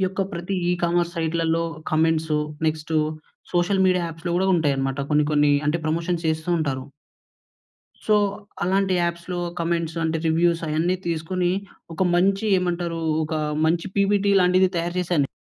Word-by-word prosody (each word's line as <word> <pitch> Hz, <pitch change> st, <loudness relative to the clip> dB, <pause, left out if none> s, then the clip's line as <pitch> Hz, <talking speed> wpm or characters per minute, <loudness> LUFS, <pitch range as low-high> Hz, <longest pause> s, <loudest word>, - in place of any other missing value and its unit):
ఈ -, -, 0 dB
యొక్క 190 Hz, +1 st, -2 dB
ప్రతీ 175 Hz, +2 st, -4 dB
e commerce 175 Hz, 0 st, +1 dB
సైట్‌ల‌ల్లొ 165 Hz, 0 st, 0 dB, 0.3 s
comments, 160 Hz, 0 st, +1 dB, 0.3 s
next 155 Hz, 0 st, -2 dB, 0.6 s
social 185 Hz, +2 st, +2 dB
media 180 Hz, -2 st, +2 dB
యాప్స్‌లో 165 Hz, +1 st, -4 dB
గూడా 190 Hz, +1 st, +1 dB
ఉంటాయనమాట 140 Hz, -3 st, 0 dB
కొన్ని 150 Hz, 0 st, +3 dB
కొన్నీ. 145 Hz, -1 st, +4 dB
అంటే, 165 Hz, +3 st, +1 dB
ప్రమోషన్స్ 165 Hz, +1 st, -1 dB
చేస్తూ 160 Hz, +2 st, -2 dB
ఉంటారు. 135 Hz, -4 st, -2 dB, 1.2 s
సో, 215 Hz, -, +4 dB, 0.5 s
అలాంటి 190 Hz, +1 st, +1 dB
యాప్స్‌లో 170 Hz, +1 st, -2 dB, 0.2 s
కమెంట్స్ 170 Hz, -1 st, -1 dB
అంటే, 160 Hz, 0 st, 0 dB
రివ్యూసయన్నీ 165 Hz, +1 st, +1 dB
తీసుకునీ, 175 Hz, +2 st, -1 dB, 0.4 s
ఒక 190 Hz, -, -1 dB
మంచి 195 Hz, +4 st, +2 dB
ఏమంటరూ 175 Hz, -2 st, -2 dB, 0.2 s
ఒకా 155 Hz, 0 st, -2 dB, 0.3 s
మంచి 170 Hz, +3 st, +1 dB
పిపీటీ 200 Hz, 0 st, +3 dB
లాంటిది 185 Hz, +1 st, +4 dB
తయారు 170 Hz, +1 st, -2 dB
చేశాను 175 Hz, -3 st, +1 dB
నే -, -, -4 dB
170 Hz, 135 wpm, -23 LUFS, 160-180 Hz, 1.2 s, కొన్నీ